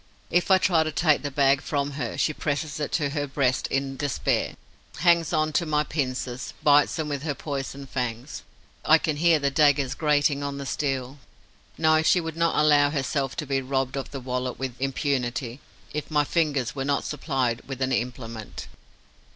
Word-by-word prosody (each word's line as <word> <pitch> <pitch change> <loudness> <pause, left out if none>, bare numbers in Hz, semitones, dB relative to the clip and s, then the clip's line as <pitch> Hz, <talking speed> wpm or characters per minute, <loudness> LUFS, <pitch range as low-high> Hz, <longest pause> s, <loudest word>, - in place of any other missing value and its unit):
If 175 +2 +2
I 190 - +7
try 185 -3 +3
to 155 0 -1
take 155 -1 +2
the 145 - -3
bag 135 0 +3
from 145 -2 -2
her, 135 -5 -4
she 155 - +1
presses 150 +1 -3
it 150 - -3
to 145 -4 0
her 145 -1 -2
breast 135 -2 0
in 135 0 -2
despair, 145 -3 -1 0.4
hangs 170 0 +3
on 155 -2 +1
to 170 - +1
my 150 -1 +2
pincers, 130 -4 -3
bites 145 0 +5
them 160 -2 -2
with 145 -2 -3
her 150 -2 -2
poison 140 -1 -5
fangs. 125 0 -4 0.4
I 155 - +6
can 155 -2 -2
hear 165 +1 +4
the 140 -1 0
daggers 145 -2 +3
grating 145 -1 +2
on 140 0 -3
the 140 - -5
steel. 135 -1 -2 0.6
No, 155 0 +4
she 170 +3 +4
would 165 -2 -5
not 165 0 +1
allow 145 -1 +5
herself 140 -2 -2
to 150 - -3
be 135 -1 0
robbed 130 0 -1
of 135 - -4
the 140 - -6
wallet 125 0 -3
with 130 -2 -4
impunity, 130 -2 -1 0.3
if 150 0 -4
my 150 -2 +2
fingers 145 -6 0
were 135 - -2
not 140 +1 0
supplied 130 -5 -1
with 135 -2 -6
an 130 0 0
implement. 115 -3 -4
140 Hz, 185 wpm, -25 LUFS, 135-150 Hz, 0.6 s, I